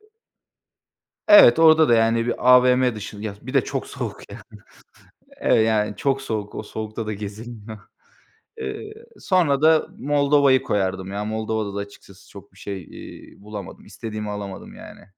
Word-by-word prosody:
Iıı 425 Hz, -, -28 dB, 1.2 s
Evet, 310 Hz, -, +8 dB
orada 160 Hz, -1 st, +6 dB
da, 120 Hz, -, +5 dB
yani, 115 Hz, +1 st, +2 dB
bir 120 Hz, +1 st, -1 dB
AVM 125 Hz, -1 st, +5 dB
dışında, 105 Hz, 0 st, -8 dB
ya 100 Hz, -, -5 dB
bir 130 Hz, +3 st, -8 dB
de 135 Hz, -5 st, +3 dB
çok -, -, -4 dB
soğuk -, -, -7 dB
yani. -, -, -10 dB, 1.0 s
Eve -, -, +2 dB
yani 110 Hz, -1 st, 0 dB
çok 135 Hz, -4 st, -1 dB
soğuk, 110 Hz, -5 st, -5 dB
o -, -, -5 dB
soğukta 110 Hz, +1 st, -6 dB
da 110 Hz, -, -2 dB
gezilmiyor. 110 Hz, +1 st, -9 dB, 0.8 s
Iıı, 430 Hz, -1 st, -6 dB, 0.3 s
sonra 160 Hz, -7 st, +1 dB
da 160 Hz, 0 st, +4 dB
Moldova'yı 140 Hz, -1 st, +3 dB
koyardım 95 Hz, -1 st, -2 dB
ya. 105 Hz, +1 st, -3 dB
Moldova'da 110 Hz, -1 st, -3 dB
da -, -, -2 dB
açıkçası 100 Hz, -1 st, -11 dB
çok 100 Hz, -1 st, -14 dB
bir 95 Hz, -, -21 dB
şey, 95 Hz, -1 st, -6 dB
iii, -, -, -13 dB
bulamadım. 105 Hz, -1 st, -9 dB
İstediğimi 105 Hz, +1 st, -7 dB
alamadım 100 Hz, -2 st, -7 dB
yani. -, -, -13 dB
110 Hz, 155 wpm, -22 LUFS, 105-135 Hz, 1.2 s, Evet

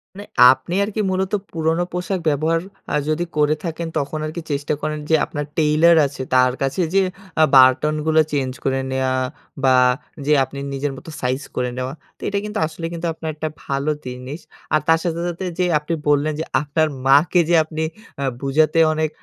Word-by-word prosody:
মানে 205 Hz, +1 st, -8 dB, 0.3 s
আপনি 135 Hz, +6 st, -3 dB
আরকি 215 Hz, +1 st, -2 dB
মূলত 190 Hz, 0 st, -1 dB, 0.2 s
পুরনো 165 Hz, +1 st, 0 dB
পোশাক 180 Hz, +1 st, -2 dB
ব্যবহার 155 Hz, +3 st, +1 dB, 0.3 s
অ্যা -, -, -2 dB
যদি 155 Hz, +3 st, 0 dB
করে 150 Hz, 0 st, +3 dB
থাকেন, 165 Hz, -1 st, -4 dB
তখন 145 Hz, +2 st, -2 dB
আরকি 155 Hz, +3 st, -5 dB
চেষ্টা 145 Hz, +1 st, -1 dB
করেন 155 Hz, 0 st, -2 dB
যে, 160 Hz, -, +5 dB
আপনার 145 Hz, 0 st, -4 dB
টেইলর 160 Hz, +2 st, +5 dB
আছে 140 Hz, -1 st, -5 dB
তার 125 Hz, 0 st, +4 dB
কাছে 135 Hz, +6 st, 0 dB
যেয়ে 195 Hz, -1 st, +3 dB, 0.3 s
অ্যা 160 Hz, -, +6 dB
বাটনগুলো 150 Hz, +4 st, +5 dB
চেঞ্জ 135 Hz, -3 st, -1 dB
করে 135 Hz, 0 st, 0 dB
নেওয়া 130 Hz, 0 st, 0 dB, 0.5 s
বা, 130 Hz, -1 st, +5 dB, 0.5 s
যে 150 Hz, -, +3 dB
আপনি 140 Hz, +1 st, -7 dB
নিজের 140 Hz, +1 st, -2 dB
মত -, -, -13 dB
সাইজ 130 Hz, +2 st, -1 dB
করে 125 Hz, 0 st, 0 dB
নেওয়া। 130 Hz, +1 st, -3 dB, 0.2 s
তো -, -, -27 dB
এটা 200 Hz, -, -1 dB
কিন্তু 210 Hz, 0 st, -3 dB
আসলে 165 Hz, +1 st, -7 dB
কিন্তু 170 Hz, 0 st, -3 dB
আপনার 160 Hz, 0 st, -6 dB
একটা 155 Hz, +1 st, -3 dB, 0.2 s
ভালো 140 Hz, +2 st, -1 dB
জিনিস। 125 Hz, +5 st, -7 dB, 0.3 s
আর 155 Hz, -, +5 dB
তার 165 Hz, 0 st, +5 dB
সাথে, 170 Hz, -2 st, -2 dB
সাথে 175 Hz, +2 st, -5 dB
যে 180 Hz, -, +3 dB
আপনি 150 Hz, +3 st, -4 dB
বললেন, 145 Hz, +1 st, +2 dB
যে 160 Hz, -, -2 dB, 0.2 s
আপনার 155 Hz, +2 st, +1 dB, 0.2 s
মাকে 145 Hz, +6 st, +5 dB
যে 175 Hz, -, +4 dB
আপনি 155 Hz, 0 st, -4 dB, 0.3 s
অ্যা 140 Hz, -, -2 dB, 0.2 s
বুঝাতে 155 Hz, +4 st, +2 dB
অনেক 155 Hz, 0 st, 0 dB
155 Hz, 185 wpm, -21 LUFS, 140-165 Hz, 0.5 s, অ্যা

